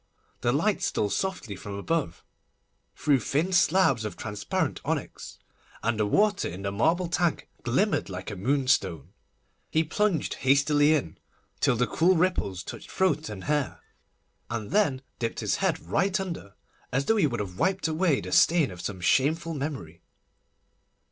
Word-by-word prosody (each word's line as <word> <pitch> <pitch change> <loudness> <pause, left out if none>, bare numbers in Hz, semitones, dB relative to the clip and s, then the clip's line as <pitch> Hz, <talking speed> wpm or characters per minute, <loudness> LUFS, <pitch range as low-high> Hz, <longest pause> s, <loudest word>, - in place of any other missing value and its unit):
The 120 - +1
light 185 +8 +1
stole 105 - 0
softly 180 - -2
from 100 +2 -7
above, 100 - -2 0.7
through 145 -3 +2
thin 155 +10 0
slabs 170 -9 +4
of 105 - -5
transparent 105 -2 -2
onyx, - - -4 0.5
and 115 -1 0
the 105 - +2
water 205 - +2
in 95 +3 -8
the 100 - -1
marble 165 - +1
tank 175 -1 0
glimmered 160 - +1
like 90 +2 -6
a - - -5
moonstone. 125 - 0 0.6
He 160 - +2
plunged 185 +1 0
hastily 145 +3 +4
in, 120 - -3 0.4
till - - +3
the 125 +2 +2
cool 170 +10 +3
ripples 160 - 0
touched - - -9
throat 160 -5 0
and 100 -3 -7
hair, 150 -1 -1 0.7
and 110 -3 -4
then 145 -11 +2 0.2
dipped 115 -1 -2
his - - 0
head - - 0
right 190 - 0
under, 170 - -6 0.4
as 135 +2 0
though 225 - +3
he 185 - +4
would 120 -4 -3
have 95 -3 -5
wiped 190 -1 +1
away 160 -2 +1
the - - -7
stain 165 - +4
of 90 -1 -9
some 95 -3 -5
shameful 160 - +2
memory. 135 - -5
140 Hz, 155 wpm, -27 LUFS, 105-175 Hz, 0.7 s, slabs